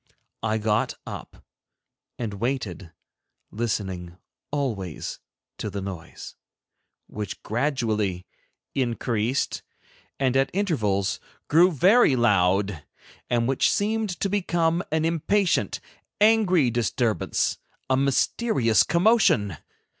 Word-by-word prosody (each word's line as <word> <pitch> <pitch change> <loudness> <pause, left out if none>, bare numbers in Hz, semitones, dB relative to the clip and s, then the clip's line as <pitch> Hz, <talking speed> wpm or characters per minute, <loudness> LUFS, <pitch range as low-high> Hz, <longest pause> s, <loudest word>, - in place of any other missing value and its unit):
I 110 0 0
got 105 -1 0
up - - -9 0.7
and 115 -4 -4
waited, 110 - -3 0.6
listening 95 -6 -3 0.3
always 110 - -3 0.4
to - - -3
the 100 - -4
noise, 95 -3 -8 0.7
which 105 -1 -6
gradually 110 -7 -1 0.5
increased, 120 -1 -1 0.6
and 130 -2 +1
at 135 0 +3
intervals 110 - 0 0.3
grew 175 +4 +6
very 180 - +5
loud, 100 -6 +2 0.5
and 120 -1 +1
which 135 0 +2
seemed 215 +1 0
to - - +2
become 175 -4 +1
an 160 0 +1
impatient, 170 +4 +1 0.4
angry 200 - +4
disturbance, 115 -1 0 0.3
a 130 - +2
mysterious 135 - +2
commotion. 170 - +3
120 Hz, 95 wpm, -25 LUFS, 105-165 Hz, 0.7 s, grew